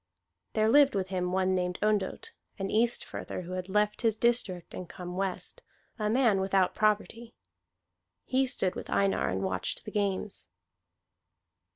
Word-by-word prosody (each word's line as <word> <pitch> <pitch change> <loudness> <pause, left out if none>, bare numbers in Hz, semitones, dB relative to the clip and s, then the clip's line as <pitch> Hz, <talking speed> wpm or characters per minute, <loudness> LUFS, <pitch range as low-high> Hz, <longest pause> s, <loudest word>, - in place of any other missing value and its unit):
There 215 0 +3
lived 280 +1 +5
with 190 -1 -1
him 180 -1 -1
one 190 0 +2
named 180 -1 -1
Ondott, 210 -3 0 0.3
an 195 0 -3
Eastfirther 230 -4 -1
who 175 - -8
had 185 0 -4
left 210 +1 +1
his 225 -2 +2
district 220 -7 0
and 180 - -7
come 180 -1 -7
west, 195 - -3 0.4
a 210 0 0
man 230 -4 +3
without 190 -1 +2
property. 215 +2 0 0.9
He 260 +1 +2
stood 190 -8 0
with - - -7
Einar 195 0 +2
and 95 +1 -2
watched 95 - -3
the 210 - -6
games. 200 -1 -2
195 Hz, 150 wpm, -29 LUFS, 185-220 Hz, 0.9 s, lived